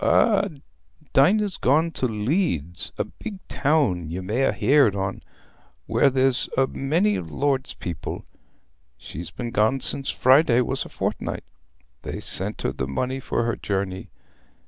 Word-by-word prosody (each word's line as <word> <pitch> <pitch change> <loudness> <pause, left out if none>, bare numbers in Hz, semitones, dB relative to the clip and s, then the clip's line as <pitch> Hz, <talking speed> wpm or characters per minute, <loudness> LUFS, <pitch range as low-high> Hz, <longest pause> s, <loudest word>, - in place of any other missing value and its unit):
"Eh, 200 -3 +4 0.7
Dinah's 195 +8 +3
gone 155 +6 +2
to 130 - -1
Leeds, 105 - -1
a - - +1
big 215 -3 -8
town 135 - +1
ye 85 +3 -4
may 110 +9 +1
ha' - - +2
heared 135 -7 +4
on, 95 0 -3 0.6
where 140 - +3
there's 130 -1 +2
a 135 - +5
many 165 +11 +1
o' - - -3
the 80 -3 -9
Lord's 140 -2 0
people. 85 -2 -6 0.7
She's 85 +2 -7
been 120 +6 -6
gone 110 +4 +2
sin' 135 +1 -1
Friday 130 -2 +4
was 125 - -2
a - - -10
fortnight: - - -3 0.6
they - - -5
sent - - -1
her - - 0
the 65 0 -3
money 130 - -2
for 120 - -1
her 120 0 0
journey. 95 -2 -3
130 Hz, 150 wpm, -24 LUFS, 95-145 Hz, 0.7 s, a